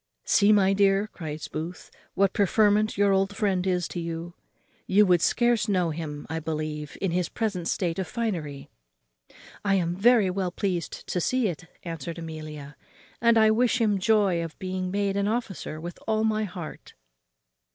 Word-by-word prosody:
"See, 205 -1 +4
my 195 -2 +4
dear," 195 0 +3
cries 155 -7 -7
Booth, 165 +4 -6 0.2
"what 195 -1 +3
preferment 210 +1 +3
your 200 0 +4
old 195 +1 +1
friend 190 -3 +1
is 180 -2 +1
come 175 - -5
to. 165 +1 -5 0.5
You 205 +2 +5
would 180 -3 +4
scarce 240 0 +2
know 180 -4 +1
him, 150 -2 -6
I 160 +1 -3
believe, 155 -1 -4
in 190 - -1
his 175 -1 0
present 200 -7 -2
state 175 -2 -1
of 185 - -2
finery." 165 - -4 0.9
"I 195 -1 +2
am 175 -2 0
very 210 -1 +4
well 185 -1 -1
pleased 180 -3 -3
to 180 - -2
see 255 +2 +1
it," 175 0 -7 0.2
answered 165 -1 -5
Amelia, 155 -3 -8 0.4
"and 235 0 +5
I 220 -1 +6
wish 245 +2 +2
him 210 -4 +2
joy 195 -4 +2
of 165 -1 -8
being 185 0 -3
made 200 0 0
an 200 0 +1
officer 210 -8 -3
with 175 +2 -7
all 220 0 +1
my 215 -1 +1
heart." 180 -5 -9
185 Hz, 170 wpm, -26 LUFS, 165-210 Hz, 0.9 s, I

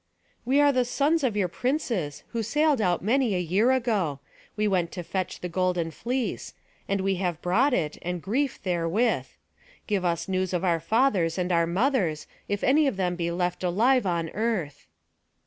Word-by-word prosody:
"We 265 +4 +3
are 290 0 +5
the 255 -2 +2
sons 290 +6 +1
of 230 -6 0
your 195 -3 +2
princes, 220 - -2
who 230 - -2
sailed 295 +3 +2
out 180 -4 +1
many 235 0 +2
a - - 0
year 185 +8 +2
ago. 210 - 0 0.4
We 215 0 +1
went 180 -4 0
to 175 - -5
fetch 185 +2 -4
the 180 - -3
golden 180 -2 -1
fleece; 245 - -3 0.3
and 195 -1 0
we 195 0 0
have 175 -3 -2
brought 235 +11 +3
it, 155 - -1
and 180 0 -3
grief 260 - -1
therewith. 180 +6 0 0.6
Give 200 -4 -1
us 170 -1 -1
news 185 -1 -1
of 180 0 -1
our 170 -3 +2
fathers 195 - +1
and 180 0 -1
our 170 -1 +3
mothers, 185 - 0 0.2
if 205 0 -2
any 290 +3 +4
of 235 - -1
them 180 -2 0
be 170 -1 -2
left 175 +1 -2
alive 220 +6 +3
on 170 -2 -1
earth." 195 -10 -2
190 Hz, 180 wpm, -26 LUFS, 175-245 Hz, 0.6 s, are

